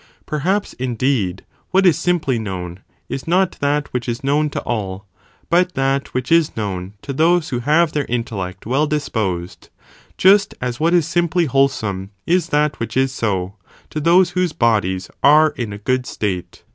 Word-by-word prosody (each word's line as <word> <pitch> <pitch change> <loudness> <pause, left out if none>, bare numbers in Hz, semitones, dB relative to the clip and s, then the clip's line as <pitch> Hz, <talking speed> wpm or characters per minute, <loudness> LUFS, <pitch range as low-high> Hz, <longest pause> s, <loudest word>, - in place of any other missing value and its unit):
Per 150 - -3
haps 195 +7 0
indeed 120 -6 -1 0.2
what 190 +1 +3
is 175 -5 +6
simply 165 -7 0
known 90 -4 -5 0.3
is 135 - -5
not 185 +2 +3
that 145 +1 0
which 125 -1 -2
is 120 +2 -4
known 150 +2 +1
'to - - -3
all, 100 -4 -4 0.4
but 180 +2 +2
that 135 +1 0
(which 130 +2 -2
is 165 -5 +3
known) 95 -3 -4
to 140 - -4
those 165 +3 +2
who 125 - -2
have 155 +6 +3
their 145 -2 -1
in 120 0 -1
tellect 95 -5 -6
well 135 +7 +1
disposed, 105 - -3 0.5
just 195 +1 +4
as 125 0 -3
what 165 +3 +3
is 165 -3 +2
simply 170 +1 +1
wholesome 120 -9 0 0.2
is 175 -1 +2
that 150 -2 +1
which 115 - -3
is 135 0 +2
so, 95 -6 -2 0.4
to 155 - -3
those 170 +4 +4
whose 180 -3 0
bodies 100 - 0
are 155 +2 +6
in 115 -4 -4
a 100 - -6
good 125 +4 -1
state. 95 -4 -4
135 Hz, 175 wpm, -19 LUFS, 110-160 Hz, 0.5 s, is